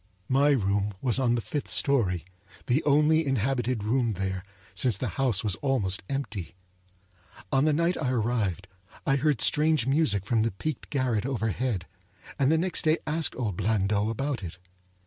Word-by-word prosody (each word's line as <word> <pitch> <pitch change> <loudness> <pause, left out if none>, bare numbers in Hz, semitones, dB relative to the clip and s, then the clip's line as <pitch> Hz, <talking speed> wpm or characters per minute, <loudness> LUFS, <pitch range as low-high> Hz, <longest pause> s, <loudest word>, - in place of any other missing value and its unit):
My 140 +3 +4
room 100 -5 +1
was 125 +2 +1
on 120 -2 +2
the 120 - -1
fifth 145 +5 -4
story; 100 - +1 0.4
the 135 +6 +1
only 150 +2 +4
inhabited 125 -3 -1
room 115 +1 +1
there, 95 -1 -3 0.3
since 120 -7 +2
the 125 +1 -3
house 120 -2 0
was 105 -3 0
almost 115 -9 0
empty. 110 -11 -4 1.0
On 135 +2 +3
the 155 - +3
night 170 +4 +1
I 135 - 0
arrived 110 -7 -1 0.4
I 135 - +2
heard 145 -3 +1
strange 150 -4 +3
music 135 - +2
from 115 +1 +1
the 115 - +1
peaked 150 +8 -5
garret 130 -5 0
overhead, 110 -5 -2 0.5
and 140 +1 +3
the 160 - +4
next 180 +3 0
day 155 +1 +2
asked 155 0 0
old 105 -8 -2
Blandot 105 0 +1
about 135 +2 -2
it. 90 -2 -7
125 Hz, 165 wpm, -27 LUFS, 105-140 Hz, 1.0 s, My